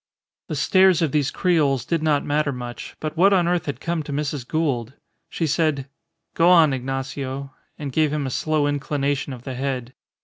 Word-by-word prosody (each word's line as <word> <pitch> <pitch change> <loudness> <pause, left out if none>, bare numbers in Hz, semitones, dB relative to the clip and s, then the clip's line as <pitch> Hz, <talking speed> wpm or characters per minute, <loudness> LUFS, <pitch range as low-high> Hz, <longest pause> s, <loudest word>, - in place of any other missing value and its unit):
The - - -3
stares 185 -3 +4
of 155 - +1
these 145 -1 +1
creoles 145 - +1
did 165 -2 0
not 150 -2 +1
matter 150 0 +1
much; 120 -2 -7
but 155 0 -4
what 195 +4 +5
on 180 -3 +3
earth 175 -2 0
had 145 - -3
come 170 -1 -2
to 150 - -7
Mrs. 145 -3 -3
Gould? 135 -7 -1 0.4
She 165 - -2
said, 155 -3 0 0.5
"Go 170 +1 +4
on, 165 -5 +6
Ignacio," 135 +1 -4 0.2
and 145 -2 -5
gave 155 +2 +2
him 150 -2 -1
a 130 - -3
slow 155 +1 0
inclination 145 -1 -1
of 125 -2 -8
the 130 - -5
head. 130 -1 -3
145 Hz, 190 wpm, -23 LUFS, 135-160 Hz, 0.5 s, on